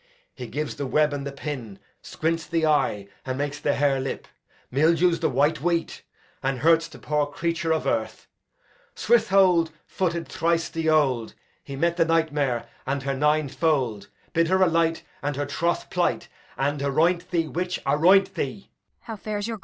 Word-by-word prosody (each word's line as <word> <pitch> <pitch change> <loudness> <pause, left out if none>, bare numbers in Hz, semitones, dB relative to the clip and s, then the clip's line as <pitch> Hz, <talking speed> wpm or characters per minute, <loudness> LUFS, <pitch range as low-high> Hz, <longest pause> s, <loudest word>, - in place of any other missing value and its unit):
He - - -8
gives 150 0 -4
the 140 - -3
web 150 +2 +2
and 140 -1 -4
the - - -4
pin, 135 -8 -6 0.2
squints 165 +1 -2
the 165 -1 +1
eye, 105 -10 +1 0.2
and 130 0 -3
makes 145 +1 -3
the 145 - 0
harelip; 135 -2 0 0.5
mildews 165 +5 +3
the 165 - +1
white 145 0 +1
wheat, 170 0 -1 0.4
and 135 0 -1
hurts 165 +1 +4
the - - -13
poor 150 -1 0
creature 165 +2 -2
of 160 - 0
earth. - - -2 0.7
Saint 480 - +4
Withold 180 -4 +3
footed 170 -3 -2
thrice 165 0 0
the 165 -1 -1
'old; 135 -7 +1 0.3
He 140 - -7
met 170 +4 0
the 165 - +4
nightmare, 145 -7 0 0.2
and 135 0 -1
her 135 0 -1
nine 150 +2 +2
fold; 130 -8 0 0.3
Bid 165 0 +3
her 190 +2 +3
alight 165 -2 +1 0.2
And 145 0 -2
her 145 +1 -2
troth 170 +4 -2
plight, - - 0 0.3
And 145 +1 -1
aroint 170 +6 +1
thee, 170 -3 0
witch, 180 +3 -3
aroint 175 +8 +4
thee! 145 +9 -5
155 Hz, 160 wpm, -25 LUFS, 140-165 Hz, 0.7 s, hurts